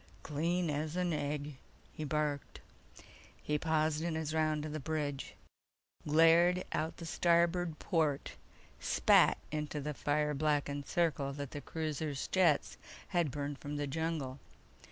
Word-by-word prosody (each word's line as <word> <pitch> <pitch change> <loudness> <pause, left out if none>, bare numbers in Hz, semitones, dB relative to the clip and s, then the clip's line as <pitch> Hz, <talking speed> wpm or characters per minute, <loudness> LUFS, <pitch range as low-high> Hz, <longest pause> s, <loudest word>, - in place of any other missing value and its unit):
"Clean 170 +4 0
as 150 +2 -2
an 180 -2 0
egg!" 145 -1 -3 0.4
he 155 - -5
barked. 150 -1 -2 0.8
He 150 0 -1
paused 155 -1 +1
in 165 -1 -1
his 160 -1 -2
round 155 -1 +1
of 155 - -5
the 155 - -3
bridge, 145 -2 -3 0.7
glared 165 +4 +5
out 160 +1 -2
the 170 - -7
starboard 170 0 +2
port, 155 -5 0 0.5
spat - - +4
into 150 0 -3
the 150 +1 -3
fire 150 +1 0
blackened 145 -1 0
circle 150 -5 0
that 140 -1 -6
the 145 - -6
cruiser's 155 -3 -3
jets 175 -6 +3 0.3
had 175 -5 +1
burned 145 0 -4
from 145 0 -5
the 145 0 -1
jungle. 145 -2 -3
155 Hz, 135 wpm, -34 LUFS, 145-165 Hz, 0.8 s, glared